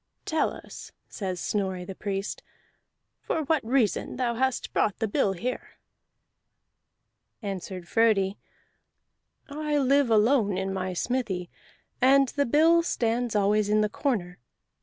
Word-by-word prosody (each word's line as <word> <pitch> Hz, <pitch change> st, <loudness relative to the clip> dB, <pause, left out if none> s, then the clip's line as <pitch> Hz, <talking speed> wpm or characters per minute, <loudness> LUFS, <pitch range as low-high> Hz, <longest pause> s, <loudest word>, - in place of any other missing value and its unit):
"Tell 315 Hz, -, +1 dB
us," -, -, -10 dB, 0.2 s
says 185 Hz, -4 st, -4 dB
Snorri 190 Hz, -3 st, -2 dB
the 195 Hz, -, -6 dB
Priest, 195 Hz, 0 st, -4 dB, 0.8 s
"for 315 Hz, -, -2 dB
what 305 Hz, 0 st, +1 dB
reason 230 Hz, -2 st, 0 dB
thou 245 Hz, -2 st, 0 dB
hast 260 Hz, +2 st, -1 dB
brought 210 Hz, -, +1 dB
the 220 Hz, -, -1 dB
bill 200 Hz, -1 st, +1 dB
here." 245 Hz, +7 st, -5 dB, 1.7 s
Answered 185 Hz, -2 st, -5 dB
Frodi: 210 Hz, -3 st, +2 dB, 1.1 s
"I 300 Hz, 0 st, -2 dB
live 275 Hz, -1 st, +3 dB
alone 215 Hz, -2 st, +3 dB
in 190 Hz, 0 st, -2 dB
my 185 Hz, -1 st, -3 dB
smithy, 190 Hz, -4 st, -2 dB, 0.5 s
and 270 Hz, +1 st, +5 dB
the 285 Hz, 0 st, 0 dB
bill 325 Hz, +6 st, +5 dB
stands 240 Hz, -7 st, -1 dB
always 205 Hz, +1 st, +2 dB
in 215 Hz, 0 st, +3 dB
the 210 Hz, -, +1 dB
corner. 205 Hz, -8 st, -2 dB
220 Hz, 125 wpm, -27 LUFS, 195-265 Hz, 1.7 s, and